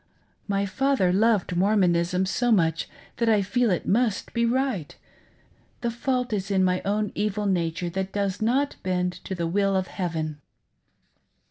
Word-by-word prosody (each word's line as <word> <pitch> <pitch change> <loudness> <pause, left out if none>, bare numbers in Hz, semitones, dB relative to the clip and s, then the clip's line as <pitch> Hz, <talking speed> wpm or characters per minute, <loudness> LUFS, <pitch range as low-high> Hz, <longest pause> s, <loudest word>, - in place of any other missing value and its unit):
My 200 -1 0
father 205 -3 +1
loved 210 -3 +2
Mormonism 180 -2 +2
so 240 +6 0
much 165 -6 +2 0.3
that 235 -1 +1
I 210 -2 +4
feel 240 +4 +1
it 180 - -1
mmt 220 -1 +1
be 235 0 +2
right; 250 - -1 0.9
the 235 - -1
fault 250 0 -1
is 195 -1 -2
in 190 -2 +2
my 180 0 +1
own 210 +1 0
evil 210 0 -1
nature 175 -2 -1
that 190 +2 -3
does 200 -1 -2
not 265 +6 +1
bend 180 -1 0
to 190 - -3
the 170 -1 -2
will 195 +3 +1
of 190 -1 +1
Heaven." 160 -5 -3
195 Hz, 155 wpm, -25 LUFS, 180-225 Hz, 0.9 s, I